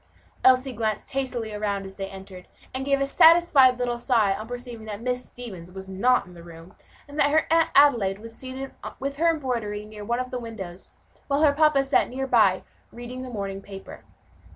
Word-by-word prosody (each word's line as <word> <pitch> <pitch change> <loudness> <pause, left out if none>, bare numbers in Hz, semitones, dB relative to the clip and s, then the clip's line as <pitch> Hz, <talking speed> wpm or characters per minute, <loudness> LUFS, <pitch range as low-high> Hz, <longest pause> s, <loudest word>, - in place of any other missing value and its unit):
Elsie 260 0 +4
glanced 220 -1 -3
hastily 250 -5 -3
around 205 -2 -2
as 190 - -9
they 195 0 -5
entered, 190 -1 -11 0.3
and 265 +1 -3
gave 275 0 +2
a 275 - +1
satisfied 285 -4 +6
little 245 -1 -2
sigh 225 -5 +2
on 215 +3 -6
perceiving 245 -2 -7
that 205 -1 -5
Miss 250 +1 -2
Stevens 190 -8 -10
was 190 +1 -9
not 245 +7 +2
in 180 - -15
the 170 - -12
room, 170 +2 -13 0.3
and 290 +1 -8
that 285 - +4
her 315 +2 +3
Aunt 330 0 +4
Adelaide 235 -10 +5
was 225 +2 -8
seated 265 +1 -7 0.3
with 275 +1 -4
her 335 +2 +3
embroidery 235 -9 -2
near 210 -1 -10
one 235 +3 -1
of 255 0 -4
the 250 - -3
windows, 195 -6 -8 0.3
while 285 +2 +1
her 290 -2 +5
papa 300 -2 +4
sat 275 +1 +2
near 265 +2 -3
by, 220 -7 +3 0.3
reading 245 +2 -8
the 255 - -7
morning 195 -4 -5
paper. 195 -1 -11
240 Hz, 200 wpm, -25 LUFS, 200-270 Hz, 0.3 s, satisfied